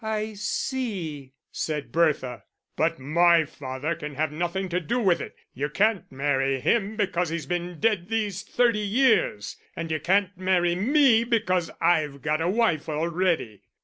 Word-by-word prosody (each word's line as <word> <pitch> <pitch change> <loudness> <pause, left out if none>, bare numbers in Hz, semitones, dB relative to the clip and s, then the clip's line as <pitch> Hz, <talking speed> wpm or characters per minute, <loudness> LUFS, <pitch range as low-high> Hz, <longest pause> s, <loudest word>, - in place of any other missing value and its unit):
"I 215 0 -2
see," 195 - -3 0.2
said 150 -2 -3
Bertha. 150 -7 0 0.3
"But - - +1
my 165 +4 +4
father 135 +2 -4
can 150 -3 -7
have 155 +1 -1
nothing 175 +4 -2
to 175 +1 0
do 235 +8 -1
with 190 -7 +2
it; - - -8 0.2
you 145 +3 -3
can't 205 +5 +1
marry 135 0 0
him 210 - +1
because 190 -5 0
he's 165 -2 -4
been 175 +1 -4
dead 210 -5 +1
these 210 -4 -1
thirty 235 -1 +1
years, 210 - +1 0.2
and 165 -1 -4
you 155 - 0
can't 195 +5 +1
marry 180 -2 +1
me 235 - +4
because 195 -8 0
I've 155 -5 +1
got 155 +1 0
a 170 - +1
wife 190 -8 +1
already." 160 - -1
175 Hz, 155 wpm, -25 LUFS, 150-210 Hz, 0.3 s, my